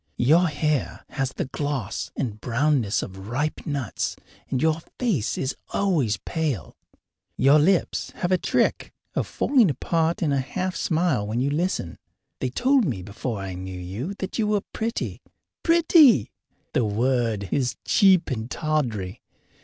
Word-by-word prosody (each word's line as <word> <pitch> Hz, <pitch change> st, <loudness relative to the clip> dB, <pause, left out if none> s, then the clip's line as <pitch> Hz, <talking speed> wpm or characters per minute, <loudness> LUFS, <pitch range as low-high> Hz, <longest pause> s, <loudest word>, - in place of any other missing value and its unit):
Your 160 Hz, +9 st, +4 dB
hair 150 Hz, -2 st, -1 dB
has 135 Hz, -1 st, -1 dB
the -, -, -3 dB
gloss 135 Hz, -6 st, -3 dB
and 110 Hz, -6 st, -3 dB
brownness 125 Hz, -3 st, +1 dB
of 95 Hz, 0 st, -8 dB
ripe 145 Hz, +7 st, -2 dB
nuts, 140 Hz, -7 st, -2 dB, 0.3 s
and 130 Hz, -, 0 dB
your 160 Hz, +2 st, +2 dB, 0.2 s
face 165 Hz, -, 0 dB
is 135 Hz, -, -2 dB, 0.2 s
always 150 Hz, -, +1 dB
pale. 150 Hz, -, -2 dB, 0.6 s
Your 140 Hz, +3 st, +6 dB
lips 180 Hz, +4 st, +2 dB
have 175 Hz, -, -2 dB
a 185 Hz, -, +5 dB
trick -, -, 0 dB, 0.2 s
of -, -, -1 dB
falling 250 Hz, -, +3 dB
apart 165 Hz, +4 st, 0 dB
in 150 Hz, -3 st, +2 dB
a 140 Hz, -, +2 dB
half 180 Hz, +8 st, -3 dB
smile 160 Hz, -, +1 dB
when 110 Hz, +3 st, -1 dB
you 135 Hz, +3 st, +1 dB
listen. 150 Hz, -, -2 dB, 0.4 s
They 130 Hz, -, -1 dB
told 260 Hz, -, +3 dB
me 120 Hz, -, -2 dB
before 105 Hz, +2 st, -4 dB
I 95 Hz, -1 st, -5 dB
knew 95 Hz, 0 st, -6 dB
you 105 Hz, -, -5 dB
that 190 Hz, +3 st, -5 dB
you 215 Hz, -, +2 dB
were 210 Hz, -1 st, +2 dB
pretty. 230 Hz, +2 st, -3 dB, 0.4 s
Pretty! 325 Hz, -, +5 dB, 0.4 s
The 125 Hz, -, +2 dB
word 115 Hz, -2 st, 0 dB
is 125 Hz, -4 st, 0 dB
cheap 190 Hz, -6 st, +4 dB
and 115 Hz, -1 st, -3 dB
tawdry. 120 Hz, -, -2 dB
140 Hz, 150 wpm, -24 LUFS, 110-175 Hz, 0.6 s, Your